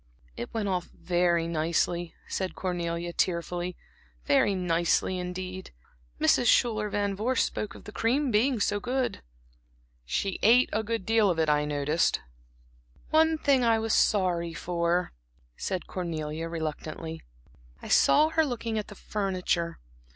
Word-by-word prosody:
"It 120 - -6
went 220 -3 -2
off 180 -3 -1
very 175 -2 0
nicely," 170 +1 -1
said 190 -1 -3
Cornelia, 175 -2 -3
tearfully, 175 0 -1 0.5
"very 195 +8 +3
nicely 175 +1 +1
indeed. 185 +1 -5 0.5
Mrs. 195 +9 +3
Schuyler 215 -3 +3
Van 200 -1 -1
Vorst 230 +5 +1
spoke 210 - -4
of - - -12
the - - -9
cream 255 +6 +1
being 235 +3 +2
so 205 0 +1
good." 250 - -2 0.8
"She 190 - -2
ate 240 +4 +5
a 215 - +1
good 220 -3 -3
deal 220 -2 +3
of 175 - 0
it, 160 -1 +2
I 150 0 +2
noticed." 150 +2 +1 0.9
"One 320 0 +4
thing 275 -4 +3
I 230 -1 +4
was 220 0 -1
sorry 175 -4 +2
for," 170 +2 -1 0.4
said 185 - -3
Cornelia, 165 -2 -4
reluctantly. 160 0 -5 0.6
"I - - -10
saw 305 +2 +5
her 320 0 +2
looking 230 -5 -2
at 210 - -5
the 205 - -11
furniture. 185 -5 -2
185 Hz, 140 wpm, -28 LUFS, 170-220 Hz, 0.9 s, ate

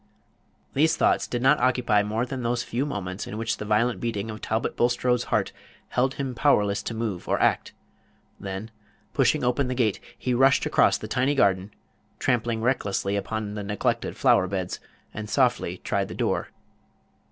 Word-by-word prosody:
These 155 +4 +3
thoughts - - +2
did 120 0 -3
not 135 +3 +5
occupy 125 -4 +3
more 110 +3 -1
than 130 0 -5
those 120 0 -1
few 130 +5 -2
moments 95 -7 -4
in 105 - -6
which 110 0 -1
the 105 - -6
violent 115 +3 +1
beating 115 -2 -3
of 110 - -9
Talbot 110 +1 -1
Bulstrode's 120 0 +1
heart - - 0 0.4
held 130 +2 +1
him 135 -2 -3
powerless 105 -6 +2
to 115 - -5
move 110 -5 -3
or - - +2
act; - - +1 0.7
then, 95 +3 -6 0.4
pushing - - +2
open 125 +2 +1
the 130 - -2
gate, 115 -6 +1 0.2
he 125 - -1
rushed 135 +2 +4
across - - +3
the - - -7
tiny 130 +3 +1
garden, 100 -5 +2 0.5
trampling 120 -3 0
recklessly 100 -5 0
upon 105 +1 -3
the 105 - -4
neglected 105 0 -2
flower 95 - +4
beds, 95 -1 -3 0.3
and 105 0 -6
softly 120 -8 +1
tried - - -1
the - - -8
door. - - -1
115 Hz, 170 wpm, -25 LUFS, 105-125 Hz, 0.7 s, not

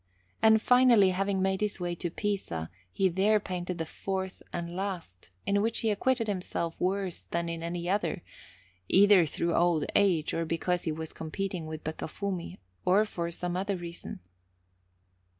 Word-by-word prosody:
And 220 0 +6
finally, 240 -5 +6
having 195 +1 0
made 190 0 0
his 210 -2 -1
way 175 -1 -2
to 175 0 -3
Pisa, 165 - -3 0.2
he 190 - +2
there 195 +4 +3
painted 180 -3 -4
the 165 - -2
fourth 190 +3 -4
and 170 0 -4
last, 180 - -5 0.2
in 200 0 +2
which 225 +2 0
he 225 - +2
acquitted 230 +2 +1
himself 180 -4 -3
worse 190 -1 -1
than 170 0 -2
in 165 0 -4
any 170 +1 -3
other, 195 -1 0 0.6
either 195 -3 +6
through 170 +3 -1
old 170 -3 +3
age, 180 -6 +3
or 165 - 0
because 165 +2 -1
he 160 - 0
was 160 +1 -6
competing 175 +1 -4
with 155 0 -6
Beccafumi, 170 +3 -4 0.3
or 195 +4 +4
for 170 -5 -3
some 175 +1 -3
other 195 +2 -1
reason. 170 - -7
180 Hz, 160 wpm, -29 LUFS, 170-200 Hz, 0.6 s, And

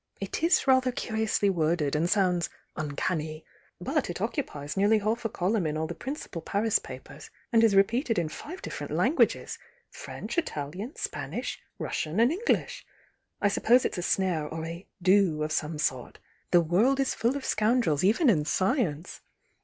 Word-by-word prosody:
It 195 +7 -4
is 335 +2 +3
rather 260 -1 +4
curiously 220 -3 0
worded 160 -5 +1
and 165 +3 +1
sounds 180 -4 +2 0.3
'uncanny!' 155 +1 -3 0.3
But - - -1
it - - -4
oc - - -1
cupies 145 0 -4
nearly 205 +3 +4
half 220 +3 -1
a - - +1
column 190 -1 0
in 150 0 -2
all 160 - -1
the - - -4
prmcipal 255 - -6
Paris 210 +4 +1
papers - - -11 0.2
and 230 0 +5
is 220 -3 +4
repeated 230 +4 +2
in 170 -2 +1
five 315 - -8
d'.fFerent - - -5
lan - - +1
guages,— - - +1 0.3
French, - - -4
Italian, 190 - -5
Spanisn, - - -4 0.2
Russian 160 +6 -2
and 235 +4 +5
Endish. 415 +8 -1 0.6
I 205 - +4
suppose 240 +5 +3
it's - - -2
a - - -1
snare 175 -4 0
or 160 +1 -5
a 170 +3 -7 0.2
'do 185 -5 +4
of 155 - -3
some 155 +1 -1
sort. 130 -5 -2 0.3
The 175 - +5
world 210 - +2
is 270 - +1
full 240 +5 0
of 275 - -7
scoundrels, 215 - +2
even 225 - +3
in 170 -11 +4
science! 185 - -1
195 Hz, 170 wpm, -28 LUFS, 160-230 Hz, 0.6 s, and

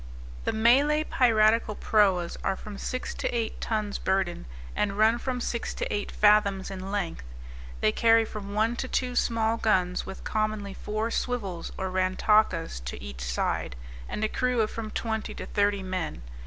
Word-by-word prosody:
The - - +2
Malay 275 +7 +4
piratical 225 -5 +3
proas 190 -6 +2
are 195 - +1
from 205 +1 -9
six 255 0 -3
to - - -2
eight 230 -2 -2
tons 215 -2 -2
burden, 190 - -1 0.3
and 200 -1 0
run 220 +2 +4
from 255 0 -2
six 235 -1 -3
to - - -3
eight 205 -1 -2
fathoms 205 -2 +3
in 190 0 -6
length. 195 -5 -2 0.6
They 105 - +4
carry 225 - +4
from 205 -2 -7
one 225 +3 +2
to 260 - -3
two 250 -1 -1
small 230 -1 +1
guns, 185 -5 +1
with 190 - -8
commonly 215 -2 -1
four 215 +3 -3
swivels 200 -11 -2
or 190 -1 -3
rantakas 185 - +2
to - - -5
each 65 -1 -8
side, - - -1 0.3
and 215 - -3
a - - +3
crew 250 +1 +1
of 215 - 0
from 225 -1 -5
twenty 220 0 -3
to - - -6
thirty 205 -1 +1
men. 185 - -4
210 Hz, 170 wpm, -27 LUFS, 190-225 Hz, 0.6 s, Malay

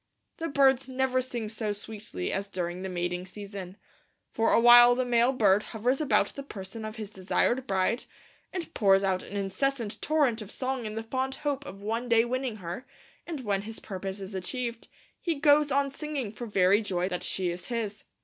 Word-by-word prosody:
The 330 - -2
birds 270 -3 +3
never 260 0 +1
sing 240 -3 -4
so 215 -1 -2
sweetly 205 - -5
as 195 +1 -2
during 180 -2 -3
the 190 - -4
mating 180 0 -2
season. 195 -1 -8 0.5
For 225 0 +2
awhile 240 +1 +8
the 255 0 0
male 240 +1 +4
bird 210 -6 +4
hovers 245 +6 -1
about 300 - +3
the 280 - -7
person 215 -4 -8
of 215 0 -6
his 215 -3 -6
desired 240 +7 0
bride, 190 +5 +1 0.5
and 345 -3 -5
pours 195 - +4
out 190 -1 +1
an 205 - -6
incessant 215 +4 -1
torrent 285 -7 +2
of 210 - -8
song 255 -1 -2
in 215 - -6
the 225 - -3
fond 260 +3 -2
hope 285 -1 -1
of 195 +1 -9
one 230 +3 -2
day 230 0 +5
winning 255 -1 -2
her; 180 +5 -7 0.4
and 320 -5 -4
when 200 -4 0
his 220 +2 -7
purpose 195 0 -5
is 195 +1 -7
achieved, 235 +5 -4 0.3
he 335 -2 0
goes 290 0 +4
on 275 +1 +2
singing 280 -6 -4
for 235 +2 -7
very 195 0 +4
joy 185 -4 -1
that 180 -2 -3
she 180 -2 -1
is 175 +1 -7
his. 220 -3 -3
225 Hz, 190 wpm, -28 LUFS, 195-260 Hz, 0.5 s, awhile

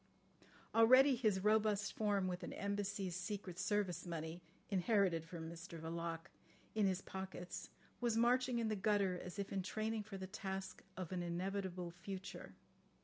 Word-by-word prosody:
Already 255 +4 +8
his 215 -6 +2
robust 210 -1 +3
form, 205 -3 +2
with 180 0 -2
an - - -5
Embassy's 200 -2 -1
secret 185 -1 -4
service 195 -3 +1
money 165 0 -4 0.3
(inherited 190 -4 +3
from 165 -1 -6
Mr 170 0 -7
Verloc) 165 0 -3 0.5
in 215 -2 +3
his 185 -1 0
pockets, 190 -2 -5 0.3
was 235 -2 +2
marching 245 +1 +4
in 230 -1 +1
the 215 - +1
gutter 200 -3 +2
as 180 +1 -7
if 200 -1 -3
in 195 - +1
training 215 +3 -1
for 205 -1 -7
the 190 - -4
task 190 -1 -4
of 185 -2 -4
an 180 -1 -1
inevitable 180 0 -2
future. 185 +2 -7
190 Hz, 150 wpm, -39 LUFS, 180-210 Hz, 0.5 s, Already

